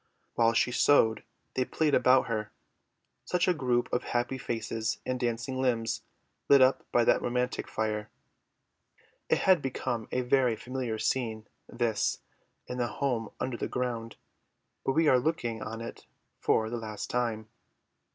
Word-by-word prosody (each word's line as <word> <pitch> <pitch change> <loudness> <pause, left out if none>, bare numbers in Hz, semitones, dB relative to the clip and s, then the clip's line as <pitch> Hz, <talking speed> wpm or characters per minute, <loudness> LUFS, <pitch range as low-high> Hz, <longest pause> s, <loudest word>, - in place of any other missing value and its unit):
While 115 0 +3
she 125 - +2
sewed 115 -4 +4 0.3
they 130 - +1
played 150 +3 0
around 130 0 +5
her; 110 -2 -3 0.7
such 180 0 0
a 180 - +4
group 125 -6 +1
of 125 - +1
happy 120 +2 -1
faces 115 -2 -2
and 130 0 -2
dancing 120 +2 -2
limbs 115 -3 0 0.5
lit 140 - +8
up 130 +1 +4
by 120 - +4
that - - +3
romantic 125 +1 -1
fire. 105 -1 -2 1.2
It - - +4
had 185 -5 +5
become 130 -3 -3
a 125 - +1
very 125 -1 +2
familiar 125 -2 -4
scene, 110 -3 -1 0.2
this, 115 -3 0 0.5
in 125 - -5
the 120 - +1
home 120 -6 -1
under 130 -2 -2
the - - -2
ground, 115 -3 -3 0.7
but 135 - +1
we 160 +1 +3
are 130 -3 +6
looking 125 -6 -2
on 115 +1 -5
it 115 - -8 0.3
for 110 0 +1
the 120 - -2
last 110 -2 -6
time. 115 -3 -1
120 Hz, 150 wpm, -29 LUFS, 115-130 Hz, 1.2 s, lit